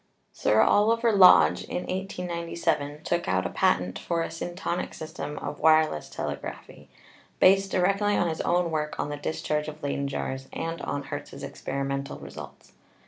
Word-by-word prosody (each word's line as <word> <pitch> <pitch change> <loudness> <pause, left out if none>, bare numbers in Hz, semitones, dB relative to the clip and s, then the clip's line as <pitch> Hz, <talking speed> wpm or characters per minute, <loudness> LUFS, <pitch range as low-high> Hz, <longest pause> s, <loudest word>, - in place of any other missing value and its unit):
Sir 110 +1 +3
Oliver 230 - +4
Lodge, 195 -3 +7
in 180 - -4
1897, 170 -5 -3
took 175 0 -1
out 95 0 +1
a 85 - -2
patent 90 +1 +1
for 170 -1 -1
a - - -4
'syntonic* 175 +2 -4
system 150 -1 -6
of 145 - -5
wireless 155 - +3
telegraphy, - - -7 0.5
based 195 +1 +5
directly 200 +3 +2
on 175 - +2
his 160 -1 -2
own 175 -1 +1
work 150 -1 -2
on 145 - -1
the 145 - -3
discharge 150 0 -2
of 155 0 -8
Leyden 140 0 -1
jars 135 -1 -4
and 165 0 -4
on 145 - -3
Hertz's 140 0 -7
experimental 140 0 -4
results. - - -11
160 Hz, 150 wpm, -27 LUFS, 140-180 Hz, 0.5 s, Lodge